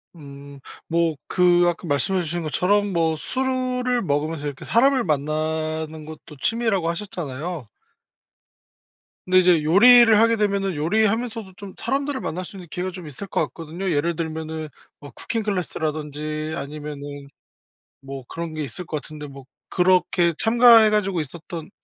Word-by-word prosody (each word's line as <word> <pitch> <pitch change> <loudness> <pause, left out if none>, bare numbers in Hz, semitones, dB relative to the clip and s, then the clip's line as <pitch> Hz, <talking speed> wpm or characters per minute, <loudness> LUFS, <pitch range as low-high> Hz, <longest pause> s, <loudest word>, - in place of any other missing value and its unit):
음. 140 -2 -12 0.3
뭐 165 -1 +1
그 175 -1 +4
아까 175 +1 -2
말씀해 165 +6 +1
주신 170 +2 -3
것처럼 200 +6 +1
뭐 165 -2 +1
술을 255 - -1
먹으면서 150 -2 -2
이렇게 140 -2 -7
사람을 260 +2 +3
만나는 155 +1 -2
것도 155 -1 -11
취미라고 225 -7 +1
하셨잖아요. 170 - -5 1.6
근데 185 0 +3
이제 175 -4 +4
요리를 225 +6 +7
하게 230 +1 +4
되면은 200 -3 0
요리하면서도 215 +5 0
좀 200 -3 -9
사람들을 275 +2 -2
만날 180 +3 -4
수 195 - -12
있는 180 -3 -10
기회가 185 0 -3
좀 180 -1 -9
있을 150 +7 -8
것 - - -1
같거든요. 170 +3 -5
예를 165 +3 0
들면은 160 -1 -5 0.3
뭐 145 -1 -11
쿠킹 225 -1 -4
클래스라든지 155 -5 -3
아니면은 145 -1 -7 0.7
뭐 135 -1 -8
그런 165 -1 -5
게 155 - -4
있을 180 +6 -7
거 155 - -3
같은데 150 0 -8
뭐 140 -1 -11 0.3
그렇게 180 -1 +2
참가해 230 -1 +6
가지고 195 -4 +1
있었던 160 +2 -8
170 Hz, 330 characters per minute, -23 LUFS, 155-200 Hz, 1.6 s, 요리를